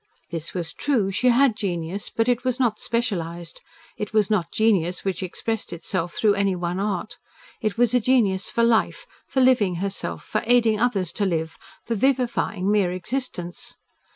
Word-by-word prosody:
This 165 +1 -5
was 170 -2 -3
true. 230 -10 0
She 250 +6 +1
had 250 -1 +4
genius, 180 -1 -3
but 225 +1 0
it 245 0 +1
was 255 0 -1
not 230 -5 +1
specialised. 175 -8 -3 0.4
It 210 0 -5
was 215 -1 +2
not 180 -6 +1
genius 190 -6 +1
which 190 -2 -1
expressed 220 +4 -3
itself 170 0 -3
through 210 -2 +3
any 200 -1 +1
one 175 +1 -2
art. 205 +2 -3 0.4
It 215 -1 -1
was 240 -1 +3
a 250 - +5
genius 215 -6 +2
for 235 - +1
life, 230 -1 +2 0.2
for 265 - +1
living 240 -8 +4
herself, 195 +3 -3
for - - -2
aiding 230 -3 +4
others 200 -8 +1
to 205 - -1
live, 160 -2 -2 0.3
for 230 - -1
vivifying 235 -5 +1
mere 200 -4 +2
existence. 240 +2 -4
205 Hz, 170 wpm, -24 LUFS, 180-235 Hz, 0.4 s, a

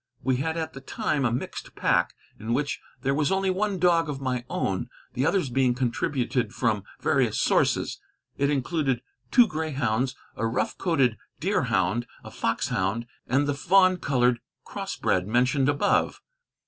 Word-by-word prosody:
We 130 0 +2
had 160 +5 -2
at 160 -1 -3
the 135 - -9
time 135 +1 -1
a 120 - +2
mixed 120 - -5
pack, - - +2 0.2
in 110 +2 -1
which 145 +1 -1 0.2
there 135 0 +2
was 150 +4 +1
only 190 0 +2
one 200 +1 0
dog 170 -3 +3
of 140 -2 -3
my 125 -2 -2
own, 95 -1 -1 0.2
the 130 +4 +1
others 170 -10 +1
being 125 -1 +2
contributed 125 -2 -1
from 110 -5 0 0.2
various - - +2
sources. - - +1 0.3
It 140 0 +1
included 135 -3 0 0.3
two 245 -2 +7
greyhounds, 135 - -1 0.2
a 115 - -1
rough 115 - -1
coated 135 - +2 0.2
deerhound, 105 +6 +1 0.2
a - - -10
foxhound, 100 +6 -1 0.2
and 135 +3 +2
the 145 - 0
fawn 185 +6 +4
colored 125 -6 +2 0.3
crossbred 90 +1 -1
mentioned 125 +4 +2
above. 145 -1 +1
135 Hz, 150 wpm, -26 LUFS, 120-155 Hz, 0.3 s, two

